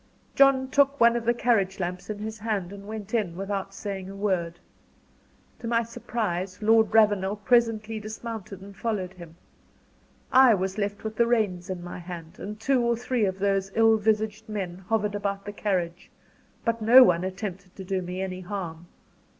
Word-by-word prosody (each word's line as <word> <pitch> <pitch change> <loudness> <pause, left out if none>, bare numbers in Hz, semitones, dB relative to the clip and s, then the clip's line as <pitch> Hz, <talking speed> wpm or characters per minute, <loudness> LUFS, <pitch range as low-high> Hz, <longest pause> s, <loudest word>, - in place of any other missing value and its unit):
John 275 -1 +5
took 280 0 +3
one 235 0 +6
of 235 -1 -2
the 235 - +3
carriage 200 -6 +1
lamps 180 +1 -4
in 210 - -3
his 215 +1 -6
hand, 200 -4 -2
and 200 0 -10
went 215 -1 -7
in, 205 -8 0
without 195 0 -3
saying 195 -1 -6
a 195 - -8
word. 185 -4 -1 1.0
To 235 - -6
my 230 0 +2
surprise 195 -5 -3
Lord 220 0 +4
Ravenel 205 -3 +3
presently 225 0 +1
dismounted 215 -2 -7
and 200 0 -12
followed 195 -4 -3
him. 170 -3 -12 1.0
I 255 -3 +7
was 190 +2 -3
left 205 0 -3
with 220 0 -5
the 235 - +4
reins 205 -6 0
in 180 -2 -4
my 175 0 -7
hand, 170 -2 -9
and 210 +1 -7
two 260 +2 +2
or 235 -1 +1
three 245 -2 0
of 190 -1 -2
those 195 0 0
ill 225 0 +5
visaged 215 0 -1
men 190 -4 -4
hovered 210 -2 +1
about 200 -1 -3
the 205 - -6
carriage; 180 -4 -2 0.6
but 230 -1 0
no 245 +4 +9
one 175 -6 +3
attempted 190 -1 -6
to 190 - -8
do 190 0 -2
me 180 +1 -4
any 185 -1 -4
harm. 175 -3 -6
205 Hz, 180 wpm, -26 LUFS, 185-225 Hz, 1.0 s, no